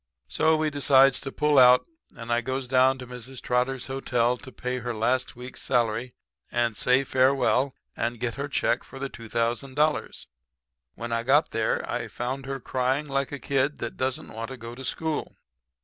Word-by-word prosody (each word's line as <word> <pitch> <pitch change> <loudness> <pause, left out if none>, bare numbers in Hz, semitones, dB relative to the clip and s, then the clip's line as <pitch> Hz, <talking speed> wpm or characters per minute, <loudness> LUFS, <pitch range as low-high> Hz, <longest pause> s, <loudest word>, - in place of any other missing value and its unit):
"So 160 0 +2
we 155 -1 0
decides 135 -2 +5
to 135 - -5
pull 150 -1 +3
out, 125 0 +7 0.3
and 115 0 -3
I 120 - +2
goes 130 +1 -3
down 130 +1 +4
to 130 - -8
Mrs. 125 +1 -9
Trotter's 125 +1 0
hotel 125 -2 0
to 130 +1 -12
pay 125 0 -3
her 120 -1 -4
last 125 +4 0
week's 125 +1 -7
salary 120 -1 0 0.4
and 120 -2 +1
say 125 +5 +3
farewell 135 0 +2 0.2
and 120 0 -2
get 120 0 -1
her 140 +3 -4
check 125 -2 +1
for 135 - -12
the 135 0 -4
$2,000. 120 +6 -1 0.7
"When 120 0 -6
I 115 0 +1
got 145 +6 +3
there 110 -1 0
I 120 -1 -3
found 130 +6 -4
her 135 0 -3
crying 130 +4 -1
like 140 0 -1
a 145 - -4
kid 140 +1 0
that - - -5
don't 130 0 -2
want 115 +1 -5
to 130 - -7
go 115 0 -8
to 130 +2 -9
school. 160 +3 -3
130 Hz, 180 wpm, -26 LUFS, 120-135 Hz, 0.7 s, out